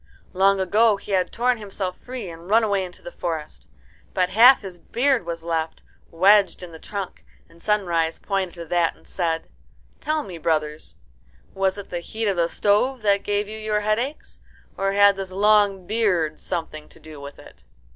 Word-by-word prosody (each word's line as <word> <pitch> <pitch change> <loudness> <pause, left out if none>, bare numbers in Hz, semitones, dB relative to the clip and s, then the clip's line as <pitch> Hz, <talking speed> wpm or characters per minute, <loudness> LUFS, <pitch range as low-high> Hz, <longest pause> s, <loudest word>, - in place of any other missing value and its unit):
Long 195 +1 +3
ago 210 +3 +3
he 200 - -10
had 185 -2 +1
torn 245 0 +1
himself 195 -3 -4
free 250 -5 -7
and 170 +1 -10
run 225 +2 +5
away 200 -3 +1
into 180 -1 -10
the 175 - -8
forest. 150 - -5 0.5
But 185 -1 +1
half 235 +5 +7
his 185 -3 -8
beard 250 -4 0
was 165 -1 -5
left, 165 -1 -3 0.3
wedged 195 +3 +4
in 175 - -9
the 160 - -11
trunk, 200 0 -6 0.2
and 165 0 -21
Sunrise 170 -6 0
pointed 195 -3 -2
to 170 -1 -7
that 170 0 +1
and - - -23
said, 165 -3 -2 0.5
"Tell 305 +1 -1
me, 180 -4 -9
brothers, 155 -1 -2 0.6
was 195 0 0
it 200 - -9
the 175 - -2
heat 220 +6 -5
of 200 -3 0
the 170 -1 +2
stove 215 +7 +1
that 200 -1 +3
gave 205 0 -1
you 215 +1 -7
your 215 -1 -1
headaches? 235 +8 -2 0.4
Or 195 0 -1
had 200 0 +5
this 190 -1 -5
long 200 -1 +3
beard 180 -8 0
something 160 -3 -5
to - - -17
do 155 -2 -12
with 140 0 -9
it?" 65 - -16
195 Hz, 185 wpm, -23 LUFS, 170-210 Hz, 0.6 s, half